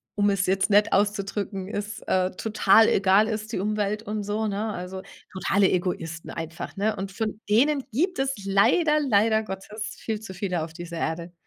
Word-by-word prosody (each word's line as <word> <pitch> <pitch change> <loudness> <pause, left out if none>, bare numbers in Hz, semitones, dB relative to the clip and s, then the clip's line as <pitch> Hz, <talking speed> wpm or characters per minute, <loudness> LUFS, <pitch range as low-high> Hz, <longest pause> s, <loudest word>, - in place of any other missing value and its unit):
um 205 0 +3
es 195 -1 +1
jetzt 195 +2 +1
nett 205 +1 +4
auszudrücken, 200 -1 -1
es, 210 +1 -5
äh, 185 0 +1
total 220 0 +4
egal 195 +3 +4
ist 215 -1 -4
die - - -2
Umwelt 210 +1 -1
und 210 -1 -3
so, 210 +2 -2
ne? 210 +1 -2
Also, 185 0 -6 0.3
totale 195 +1 +2
Egoisten 170 -2 -2
einfach, 165 +4 -6
ne? 210 +1 +1
Und 195 0 -5
von 215 +1 -3
denen 275 +6 +3
gibt 350 - 0
es 270 0 +1
leider, 300 - +3
leider 220 -4 +3
Gottes 210 +2 -6
viel 220 -2 -3
zu 190 -4 -9
viele 180 -4 -2
auf 160 - -7
dieser 170 0 -8
Erde. 170 +2 -3
205 Hz, 180 wpm, -25 LUFS, 190-220 Hz, 0.3 s, nett